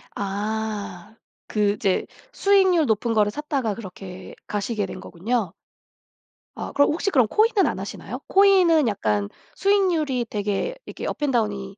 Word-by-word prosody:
아. 205 -1 -4 0.3
그 210 -2 +1
이제 195 -2 0 0.3
수익률 380 -7 +4
높은 225 0 0
거를 210 -2 +3
샀다가 270 -3 -2
그렇게 190 -3 -9
가시게 210 0 -2
된 185 - -8
거군요. 200 +2 -2 1.0
아 - - -5
그럼 285 +1 +4
혹시 345 +6 -1
그럼 255 - +4
코인은 430 - +3
안 - - -1
하시나요? - - -6
코인은 370 -7 +5
약간 105 - -1 0.3
수익률이 340 -11 +1
되게 210 - -2
이렇게 - - -7
업앤다운이 210 -8 -1
220 Hz, 295 characters per minute, -23 LUFS, 200-315 Hz, 1.0 s, 코인은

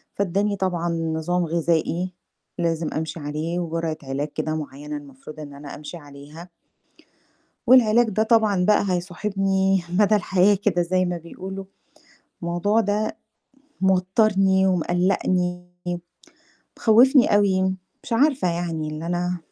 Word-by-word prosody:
فادّاني 200 +2 0
طبعًا 175 -2 -1
نظام 165 +1 -1
غذائي 170 +2 0 0.5
لازم 165 -2 0
أمشي 160 +1 -4
عليه 155 +4 -3
وجرعة 165 -2 -3
علاج 135 +2 -3
كده 155 0 -2
معينة 150 0 -6
المفروض 145 +2 -12
إن 145 -2 -8
أنا 145 0 -9
أمشي 150 +3 -8
عليها. 145 +3 -12 1.2
والعلاج 240 -2 +5
ده 215 +1 +1
طبعًا 220 -5 +3
بقى 210 +1 +4
هيصاحبني 190 +1 0 0.2
مدى 210 +1 +5
الحياة 195 0 +3
كده 195 -3 0
زي 185 +2 +1
ما 175 -1 -2
بيقولوا. 190 +3 -8 0.8
الموضوع 175 +6 +1
ده، 210 0 -1 0.7
موتَّرني 190 0 +3
ومقّلقّني 180 0 0 1.1
مخوّفني 245 +2 +5
أوي 195 -2 +2 0.4
مش - - -7
عارفة 270 -2 +2
يعني 170 -2 -3
اللي 155 +2 -6
أنا 175 +1 -1
180 Hz, 115 wpm, -23 LUFS, 160-195 Hz, 1.2 s, والعلاج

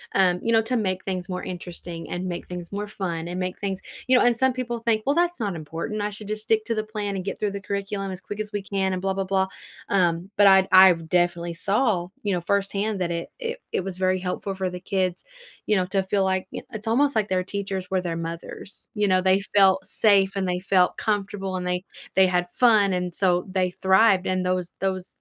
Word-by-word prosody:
um, 180 -2 +3
you 230 - 0
know, 225 -1 +4
to 250 +3 -1
make 190 -5 -1
things 185 -1 -3
more 180 0 -4
interesting 175 -2 -7
and 175 +1 -3
make 175 -1 -5
things 180 -1 -7
more 205 +1 -3
fun 170 -5 -4
and 175 +1 -4
make 185 0 -3
things 195 -2 -3 0.3
you 255 0 +5
know, - - +4
and 245 -1 +4
some 260 +1 +3
people 240 -2 -3
think, 225 -1 +1
"Well, 280 - +3
that's 350 -1 +1
not 205 -6 -2
important, 165 +7 -4
I 205 - -1
should 210 0 -9
just 215 0 -3
stick 220 -1 +1
to 230 - -1
the 215 - -1
plan, 210 -2 -4
and 190 - -3
get 195 - -4
through 210 -1 0
the 200 0 -5
curriculum 200 0 -3
as 185 - -6
quick 205 - -7
as 210 -1 -4
we 205 -2 -3
can, 190 -1 -1
and 180 - -3
blah 195 0 0
blah 195 0 -2
blah," 190 0 +1 0.4
um, 180 0 +1
but 205 - +7
I'd 190 -1 +6
I 185 0 +9
definitely 170 +1 0
saw, 200 -1 +1 0.2
you 205 -2 0
know, 175 - -1
firsthand 200 +2 0
that 175 -1 -1
it 170 0 -3
it 470 +1 -4
it - - -1
was 190 -1 -5
very 185 0 +2
helpful 190 +2 -3
for 190 -1 -2
the 180 - -6
kids, 185 -1 -1 0.4
you 215 - +3
know, 185 -2 +2
to 195 +1 +1
feel 195 +1 +1
like 190 0 0
y - - -5
it's 215 0 -6
almost 280 +4 +2
like 215 -2 +1
their 185 -1 +1
teachers 195 -1 -4
were 190 -1 +1
their 170 -2 -3
mothers, 165 +4 -7
you 210 -1 +2
know? 185 -1 +3
They 190 +1 +3
felt 190 -1 +5
safe, 195 -1 +3
and 195 -1 -1
they 180 0 -1
felt 185 -1 +2
comfortable, 200 -2 -2
and 180 0 -4
they 180 0 -1 0.3
they 190 - +6
had 180 -1 +1
fun, 215 -5 +4
and 180 -1 -2
so 180 -2 +2
they 185 -1 +1
thrived, 190 +1 +4
and 185 0 0
those 180 -1 -1
those, 190 -1 -1
190 Hz, 240 wpm, -24 LUFS, 180-205 Hz, 0.4 s, I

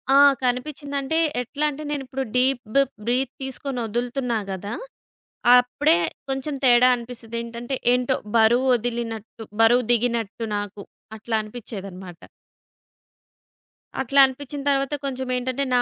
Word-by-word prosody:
ఆ! - - +8 0.3
కనిపిచిందంటే 280 +3 -2 0.2
ఎట్లంటే, 295 +3 -2
నేనిప్పుడు 270 -2 -3
డీప్ 250 -3 +1 0.3
బ్రీత్ 255 +2 0
తీసుకుని 265 -1 -4
ఒదులుతున్నా 240 +1 -1
గదా, 195 +3 -5 0.9
అప్పుడే 250 - +2 0.3
కొంచేం 270 +2 -2
తేడా 245 0 +6
అనిపిస్తదేంటంటే, 235 +1 -6 0.2
ఏంటో 250 +1 +1 0.2
బరువొదిలినట్టు, 230 -2 +1 0.2
బరువు 240 +1 +5
దిగినట్టు 230 -1 -1
నాకు 205 0 -6 0.3
అట్లా 225 +1 -3
అనిపిచ్చేదనమాట. 195 -6 -9 1.8
అట్లా 275 +2 +2
అనిపిచిన 280 +2 -6
తర్వాత 275 +1 +1
కొంచేం 260 -1 -3
ఏంటంటే, 255 +2 -2
నా 245 - +5
245 Hz, 100 wpm, -23 LUFS, 230-270 Hz, 1.8 s, ఆ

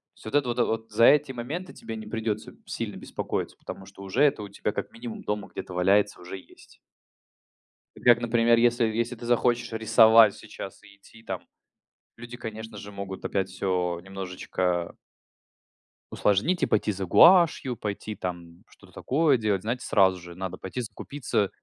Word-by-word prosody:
То - - -29
есть - - -18
вот 110 - -4
это 125 -4 +2
вот, 110 0 -3
за 115 +2 +5
эти 150 -2 +5
моменты 145 +10 -5
тебе 115 - -7
не 110 -1 -8
придется 110 -1 -3
сильно - - -5
беспокоиться, - - -4
потому 95 - -9
что 100 0 -14
уже 100 +9 +1
это 135 -7 +3
у 100 - -8
тебя 100 - -3
как - - -5
минимум 115 -1 -8
дома 105 -1 -3
где-то 90 - -7
валяется, 100 +2 +2
уже 90 +2 -7
есть. - - -18 1.3
Как, 120 -1 +6
например, 115 0 +3
если 120 0 +3
если 115 +2 -1
ты 120 - -10
захочешь 120 0 +1
рисовать 110 -1 +6
сейчас - - -10
и 100 - -17
идти 110 +3 -18
там - - -4 0.8
люди, 120 +1 -9
конечно 110 -2 -7
же, 100 +1 -9
могут 100 -1 -7
опять 95 -1 -1
всё 90 -3 -1
немножечко 90 -2 -3 1.2
усложнить 105 - +1
и - - +6
пойти 105 0 +1
за 95 -1 -4
гуашью, 165 - +5
пойти 105 +1 -5
там 85 -2 -7
что-то - - -20
такое 145 -1 +2
делать, 105 -4 0
знаете, 120 +3 -3
сразу 95 -2 +3
же 85 0 -11
надо 95 0 -5
пойти 110 +7 -5
закупиться 115 -3 -2
110 Hz, 165 wpm, -26 LUFS, 95-120 Hz, 1.3 s, Как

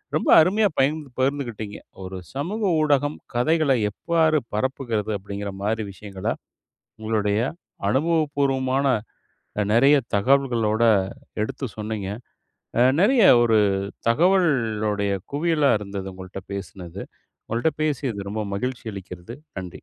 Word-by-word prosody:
ரொம்ப - - 0
அருமையா 205 +6 +3
பகிர்ந்து 145 +1 +1
பகிர்ந்துக்கிட்டீங்க. 120 -6 -2 0.3
ஒரு 95 0 -6 0.2
சமூக 175 +11 -3 0.2
ஊடகம் 145 0 +2 0.2
கதைகளை 145 +2 +3 0.2
எவ்வாறு 160 - +2 0.2
பரப்புகிறது? 115 -3 -1
அப்டிங்கிற 100 +1 -6
மாரி 110 +1 0
விஷயங்கள. 100 -1 -8 0.7
உங்களுடைய 105 -1 0 0.5
அனுபவப்பூர்வமான, 140 -3 +1 0.8
அ - - +3
நெறைய 135 +6 +6 0.2
தகவல்களோட 115 -2 +2 0.6
எடுத்து 135 +5 -4
சொன்னீங்க. 105 -2 -4 0.7
அ - - +7 0.2
நெறைய 240 +5 +5 0.2
ஒரு 115 -2 +4 0.5
தகவலுடைய 115 - +2 0.2
குவியலா 150 -1 +2
இருந்துது, 100 -1 -5
உங்கள்ட்ட 95 +1 -8
பேசுனது. 95 -2 -7 0.4
உங்கள்ட்ட 120 +8 0
பேசியது 130 -9 -2
ரொம்ப 110 0 -2
மகிழ்ச்சி 125 +2 -4
அளிக்கிறது. 90 +3 -9 0.2
நன்றி. 90 -1 -5
120 Hz, 105 wpm, -23 LUFS, 105-145 Hz, 0.8 s, அ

